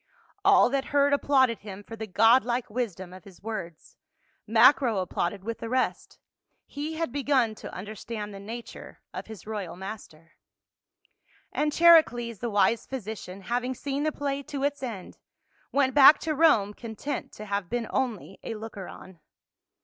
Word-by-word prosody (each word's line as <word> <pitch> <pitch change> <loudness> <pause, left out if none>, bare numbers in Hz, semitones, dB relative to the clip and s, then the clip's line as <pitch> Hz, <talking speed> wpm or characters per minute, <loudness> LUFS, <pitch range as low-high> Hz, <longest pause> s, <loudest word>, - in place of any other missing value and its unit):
All 400 +1 +6
that 275 -1 0
heard 285 0 +2
applauded 265 -4 +3
him 205 -1 -9
for 225 - -9
the 220 -1 -6
god 225 +6 +5
like 240 -1 -2
wis 235 -5 -2
dom 185 -1 -10
of 185 -2 -12
his 195 -2 -16
words. 190 -7 -7 0.5
Macro 230 +1 +5
applauded 185 +1 -2
with 230 +2 -5
the 230 - -5
rest; 255 +1 -1 0.5
he 300 +3 -5
had 330 -5 -2
begun 265 -4 +1
to - - -9
understand 210 +2 -7
the 195 - -8
nature 230 +4 -9
of - - -6
his 220 -2 -10
royal 205 -5 -5
master. 180 -4 -10 1.1
114 - - -29
PA - - -4
UL. - - +2
And 300 0 +2
Charicles, 265 - +5
the 240 - -3
wise 220 +2 +2
physician, 215 -6 -7
having 245 +5 -2
seen 280 +2 -3
the 310 +1 +1
play 280 -1 -3
to 280 0 -5
its 285 0 -1
end, 225 -8 -7 0.5
went 270 -2 +2
back 290 +1 +9
to 320 - -1
Rome 230 -10 +4
content 230 +6 -6
to 215 - -9
have 200 -3 -3
been 240 -1 -2
only 235 -7 -3
a 225 - -5
looker 215 -3 -8
on. 185 -3 -12
230 Hz, 170 wpm, -27 LUFS, 205-275 Hz, 1.1 s, back